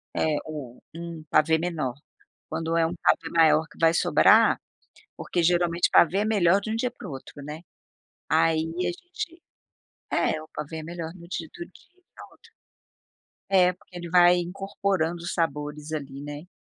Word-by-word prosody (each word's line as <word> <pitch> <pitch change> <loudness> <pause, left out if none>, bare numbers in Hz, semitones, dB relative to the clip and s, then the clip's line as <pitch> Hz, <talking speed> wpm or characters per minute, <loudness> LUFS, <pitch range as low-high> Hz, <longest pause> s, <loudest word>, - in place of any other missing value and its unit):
É, 155 -2 +1
ou 145 -6 -8
um 170 -1 -7
pavê 160 +1 +4
menor. 160 -7 -2 0.6
Quando 165 +1 -2
é 165 - +3
um 165 - -4
pavê 165 - +2
maior 160 -1 +4
que - - -19
vai 165 -1 +5
sobrar, - - +5 0.6
porque 175 - -2
geralmente 175 0 +2
pavê 170 +4 +5
é 205 - +1
melhor 200 -3 +3
de 215 - -5
um - - -1
dia 245 +2 -1
para - - -11
o - - -7
outro, 135 - -9
né. 150 +3 -7 0.7
Aí 160 0 +3 0.2
a 180 -1 0
gente 340 - -8 0.7
é, 155 - +1
o 155 - -12
pavê 150 +2 -6
é 160 - -6
melhor 165 0 -6
no 170 -2 -13
di 170 -2 -5
do 170 - -6
dia 340 - -22
e 370 - -30
do - - -15
outro. - - -21 1.0
É, 180 -2 +5
porque 180 0 -17
ele 175 -1 -7
vai 175 0 +6
incorporando 180 -2 -2
sabores 150 -2 -3
ali, 140 -3 -5
né. 145 +3 -8
170 Hz, 175 wpm, -26 LUFS, 155-180 Hz, 1.0 s, vai